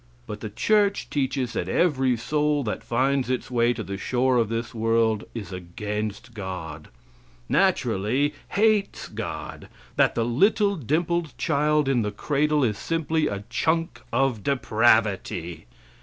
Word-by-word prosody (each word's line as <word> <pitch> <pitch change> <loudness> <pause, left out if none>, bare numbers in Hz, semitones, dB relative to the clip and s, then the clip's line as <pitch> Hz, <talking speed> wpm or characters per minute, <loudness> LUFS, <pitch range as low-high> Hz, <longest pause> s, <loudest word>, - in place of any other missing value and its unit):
But 105 - -6
the 110 - -5
church 205 - +1
teaches 130 -3 -1
that 90 - -2
every 135 - +2
soul 150 +4 0
that 105 - -4
finds 130 +2 +1
its 130 0 -2
way 120 -1 +3
to 115 -2 -4
the 100 -1 -6
shore 125 +3 +1
of 115 -3 +2
this 115 +1 -3
world 115 -1 +1
is 105 -4 -6
against 105 +5 -5
God 90 -7 -6 0.6
naturally 130 +10 +1
hates 210 -1 +1
God; - - -6 0.3
that - - +3
the 115 - +1
little 200 - +3
dimpled 165 - -1
child 150 -1 +2
in 130 -3 +2
the 105 - -1
cradle 145 +7 +1
is 105 -5 0
simply 160 -1 0
a 100 0 -4
chunk 165 +6 0
of 135 -5 +1
depravity. 110 - +1
125 Hz, 140 wpm, -25 LUFS, 105-150 Hz, 0.6 s, way